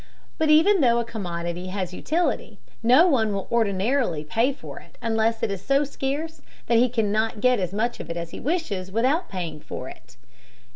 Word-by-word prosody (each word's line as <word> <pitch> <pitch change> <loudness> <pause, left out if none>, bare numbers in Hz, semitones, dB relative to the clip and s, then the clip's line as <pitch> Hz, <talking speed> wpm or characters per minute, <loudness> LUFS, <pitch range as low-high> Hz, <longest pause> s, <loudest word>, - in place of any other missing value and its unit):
But 315 -1 +2
even 330 +5 +5
though 235 -3 +4
a 235 - 0
commodity 175 -5 -4
has 185 -1 -4
utility, 295 - -1 0.2
no 250 +9 +6
one 230 - +2
will 195 -1 -3
ordinarily 220 - +1
pay 225 - +1
for 280 - -9
it - - -19
unless 225 0 0
it 220 - +1
is 195 -1 -5
so 275 +4 +3
scarce 290 +3 -4 0.2
that 235 -1 +3
he 250 +1 +4
cannot 220 -1 0
get 250 +1 +3
as 180 -2 -2
much 225 +4 -1
of - - -8
it 170 - -3
as 170 -1 -5
he - - -7
wishes 235 - -2
without 260 - +1
paying 170 -5 -5
for 130 -3 -7
it. 125 0 -15
225 Hz, 190 wpm, -24 LUFS, 185-270 Hz, 0.2 s, no